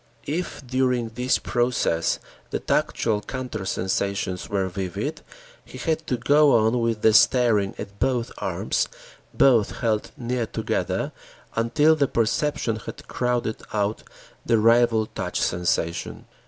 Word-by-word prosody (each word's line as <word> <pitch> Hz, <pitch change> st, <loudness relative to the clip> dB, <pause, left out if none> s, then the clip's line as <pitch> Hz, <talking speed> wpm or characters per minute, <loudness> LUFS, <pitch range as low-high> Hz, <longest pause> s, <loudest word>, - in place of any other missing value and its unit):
If 160 Hz, -2 st, -4 dB
during 125 Hz, -2 st, 0 dB
this 125 Hz, +3 st, +1 dB
process, 120 Hz, -9 st, 0 dB, 0.3 s
the -, -, -2 dB
tactual 110 Hz, -3 st, 0 dB
counter 125 Hz, -5 st, -5 dB
sensations 95 Hz, 0 st, -2 dB
were 100 Hz, -2 st, 0 dB
vivid, 100 Hz, -, -4 dB, 0.4 s
he -, -, -11 dB
had 160 Hz, -1 st, -2 dB
to 125 Hz, -, 0 dB
go 145 Hz, +3 st, +5 dB
on 110 Hz, +2 st, +3 dB
with 115 Hz, -2 st, -1 dB
the 110 Hz, -, +6 dB
staring 110 Hz, -5 st, +4 dB
at 100 Hz, 0 st, -8 dB
both 125 Hz, -1 st, 0 dB
arms, -, -, -1 dB, 0.4 s
both 120 Hz, -6 st, +3 dB
held 110 Hz, -3 st, 0 dB
near 120 Hz, -1 st, -2 dB
together -, -, -2 dB, 0.4 s
until 145 Hz, +8 st, +3 dB
the 145 Hz, -3 st, +2 dB
perception 120 Hz, 0 st, 0 dB
had 110 Hz, -, -9 dB
crowded 120 Hz, -3 st, -1 dB
out 105 Hz, 0 st, 0 dB, 0.4 s
the 115 Hz, -, +3 dB
rival 115 Hz, 0 st, +4 dB
touch -, -, -4 dB
sensation. 85 Hz, -1 st, -1 dB
115 Hz, 125 wpm, -24 LUFS, 105-125 Hz, 0.4 s, the